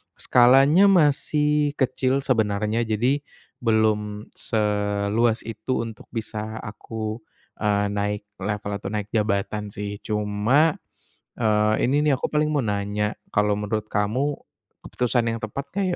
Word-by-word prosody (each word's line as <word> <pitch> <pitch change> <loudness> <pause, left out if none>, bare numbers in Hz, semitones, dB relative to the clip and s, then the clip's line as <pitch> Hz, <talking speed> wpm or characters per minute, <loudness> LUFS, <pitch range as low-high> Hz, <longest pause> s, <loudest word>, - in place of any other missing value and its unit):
skalanya 135 +10 +5
masih 150 -3 +3
kecil 130 0 0
sebenarnya 110 -2 0
jadi 120 +6 +1 0.4
belum 110 -2 0
seluas 105 +1 0
itu 115 +2 -3
untuk 110 -2 -10
bisa 110 -1 -5
aku, 110 +1 -5 0.4
eee, 105 -1 +1
naik 105 0 -2 0.2
level 105 +1 -3
atau 95 - -5
naik 105 -1 -4
jabatan 105 -1 -1
sih 100 +1 -6
cuma, 105 +9 +1 0.6
eee, 110 -1 +3 0.2
ini 145 +2 +2
nih - - +4
aku - - -1
paling 150 0 +2
mau 145 - +2
nanya 105 0 -1 0.2
kalau 105 0 +2
menurut 105 +1 -3
kamu 125 +8 0 0.5
keputusan 120 -1 0
yang 115 - -3
tepat 135 +6 -5
nggak 200 0 0
110 Hz, 125 wpm, -24 LUFS, 105-130 Hz, 0.6 s, skalanya